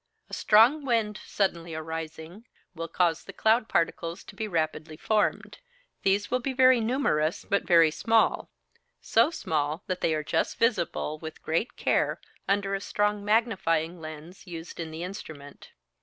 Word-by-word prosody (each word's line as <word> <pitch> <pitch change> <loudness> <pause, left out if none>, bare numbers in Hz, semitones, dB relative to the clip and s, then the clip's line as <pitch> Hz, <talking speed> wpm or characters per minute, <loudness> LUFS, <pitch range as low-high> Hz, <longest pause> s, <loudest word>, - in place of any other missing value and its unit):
A - - -13
strong 235 +8 +5
wind, 225 -5 0
suddenly 170 -5 -1
arising, 160 +5 -7 0.3
will 165 -1 -5
cause 165 -1 +1
the - - -9
cloud 220 +1 +2
particles 170 +1 -1
to - - -13
be 220 - -3
rapidly 155 -3 -2
formed: 215 +4 0 0.4
these 200 +1 +1
will 250 - +2
be 265 +2 -3
very 255 -1 +5
numerous, 220 - 0
but 200 - 0
very 165 -3 +6
small 225 +6 +2 0.5
so 230 +6 +3
small 155 - -2
that 185 -1 -3
they 160 - +2
are 155 - -2
just - - -1
visible 175 -8 0
with 160 0 -9
great 165 +9 -1
care - - +1 0.3
under 195 0 +1
a 195 - -1
strong 205 0 0
magnifying 185 -7 +1
lens 155 +5 -10
used 165 -1 -8
in 165 -1 -4
the 160 +2 -6
instrument. 160 -7 -9
180 Hz, 155 wpm, -27 LUFS, 160-220 Hz, 0.5 s, very